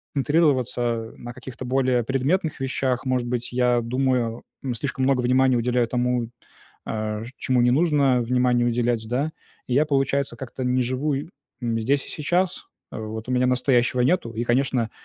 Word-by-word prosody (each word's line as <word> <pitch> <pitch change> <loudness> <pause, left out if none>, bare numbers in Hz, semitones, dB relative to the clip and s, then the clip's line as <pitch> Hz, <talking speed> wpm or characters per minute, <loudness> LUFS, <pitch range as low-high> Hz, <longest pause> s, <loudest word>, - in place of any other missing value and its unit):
концентрироваться 130 -6 +1
на 120 0 -8
каких-то 130 0 -8
более 130 -2 +2
предметных 140 - 0
вещах? 130 -1 -1
Может 130 -2 0
быть, 125 0 -3
я 125 -1 +2
думаю, 125 -1 0 0.2
м, 130 -3 -2
слишком 135 +1 -2
много 135 -2 +2
внимания 130 +1 +3
уделяю 120 0 +1
тому, 125 -1 0 0.6
э, 110 0 -3
ш - - -9
чему 130 -1 +1
не 120 - +4
нужно 140 -4 +3
внимания 125 0 +2
уделять, 120 -1 0
да. 135 +6 0 0.4
И 125 - -1
я, 145 +4 +4
получается, 140 -2 0
как-то 130 +1 -6
не 125 +1 +2
живу, 130 +4 -1
и 140 +4 -4 0.3
м, 115 -1 0
здесь 140 +5 0
и - - -9
сейчас. 175 +4 -1 0.2
В - - -6
вот 110 +1 -6
у - - -1
меня 125 0 +2
настоящего 125 0 +2
нету, 130 -3 +1
и, 115 - -2
конечно, 120 -2 +1
125 Hz, 170 wpm, -24 LUFS, 120-135 Hz, 0.6 s, не